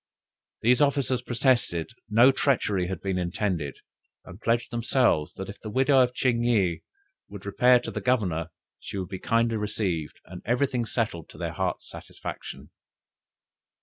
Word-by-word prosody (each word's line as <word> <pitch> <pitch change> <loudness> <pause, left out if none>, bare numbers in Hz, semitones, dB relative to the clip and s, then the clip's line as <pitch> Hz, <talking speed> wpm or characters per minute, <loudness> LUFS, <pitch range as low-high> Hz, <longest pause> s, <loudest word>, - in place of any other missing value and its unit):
These 125 +5 +4
officers 140 -3 +2
protested 120 - +1 0.2
no 120 +5 +6
treachery 105 -10 +1
had 95 -2 -5
been 95 -2 -1
intended, 85 -4 -2 0.5
and 95 +4 -12
pledged 115 +1 0
themselves, 120 - +1
that 95 - -6
if 100 - -10
the 110 - -6
widow 130 +4 +4
of 125 0 +1
Ching 120 -3 +1
yih 100 -8 +2 0.5
would 100 -1 -10
repair 125 +5 +5
to - - -5
the - - -4
Governor, 90 -10 0 0.3
she - - -7
would 95 -2 -4
be 95 - -5
kindly 115 -2 +1
received, 100 -7 -2
and 90 0 -10
every 125 +4 +2
thing 125 -3 -2
settled 105 -10 -2
to - - -14
their - - -4
hearts' - - -2
satisfaction. - - -8
110 Hz, 155 wpm, -26 LUFS, 95-125 Hz, 0.5 s, no